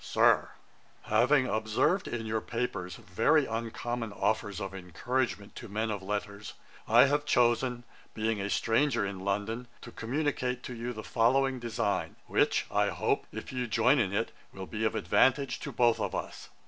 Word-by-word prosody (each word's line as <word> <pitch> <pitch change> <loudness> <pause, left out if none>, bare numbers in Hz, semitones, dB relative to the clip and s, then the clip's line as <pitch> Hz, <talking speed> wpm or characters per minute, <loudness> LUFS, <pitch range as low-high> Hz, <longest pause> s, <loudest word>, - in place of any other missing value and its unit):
'SIR, - - +3 0.5
'Having 130 +5 +3
observed 110 - +1
in 115 -2 -4
your 110 0 -1
papers 105 -8 -3
very 135 - +2
uncommon 115 0 -3
offers 100 0 -1
of 95 -1 -5
encouragement 100 +4 -3
to - - -8
men 110 +2 -1
of 100 -2 -3
letters, 100 +1 -5 0.3
I 120 +4 +7
have 145 +1 +1
chosen, 120 -2 +2 0.3
being 110 -1 -1
a 100 - -2
stranger 115 +1 +2
in 100 -1 -5
London, 105 +5 -2
to 120 - -10
communicate 125 0 -2
to 125 - -6
you 120 +1 -4
the 110 -2 -7
following 130 +4 +2
design, 120 -2 -2
which, - - +2
I - - +2
hope, - - -1
if - - -7
you 125 -1 -2
join 120 +5 +3
in 100 -5 +1
it, 105 +3 -1 0.2
will 95 0 -7
be 110 +3 -3
of 110 - 0
advantage 135 -1 +2
to - - -6
both 120 -2 +3
of - - -2
us. - - -6
115 Hz, 165 wpm, -30 LUFS, 105-125 Hz, 0.5 s, I